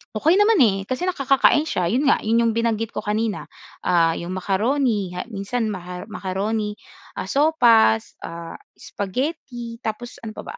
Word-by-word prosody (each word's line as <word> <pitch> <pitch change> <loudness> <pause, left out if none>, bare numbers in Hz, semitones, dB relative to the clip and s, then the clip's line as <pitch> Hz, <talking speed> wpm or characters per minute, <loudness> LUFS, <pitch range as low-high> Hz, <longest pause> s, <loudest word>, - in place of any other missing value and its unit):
okey 315 - +3
naman 415 -2 +4
eh 210 -6 +5
kasi 255 - -3
nakakakain 275 -3 +3
siya, 180 - -1
yun 250 +9 +1
nga 280 - +4
yun 230 +2 +2
yung 230 - +2
binanggit 225 -1 0
ko - - -4
kanina. 210 0 -2 0.3
Ah 170 -2 +3
yung 180 +2 -5
macaroni 205 0 0
ha 180 - -3
minsan 215 +3 -2
maha 180 -2 -7
macaroni, 210 +1 -3 0.4
ah - - -3
sopas, 235 - +3
ah, 170 0 -8 0.2
spaghetti, 240 - -5
tapos 235 +2 -6
ano 220 -1 -8
pa - - -7
ba? - - -9
220 Hz, 160 wpm, -22 LUFS, 195-255 Hz, 0.4 s, eh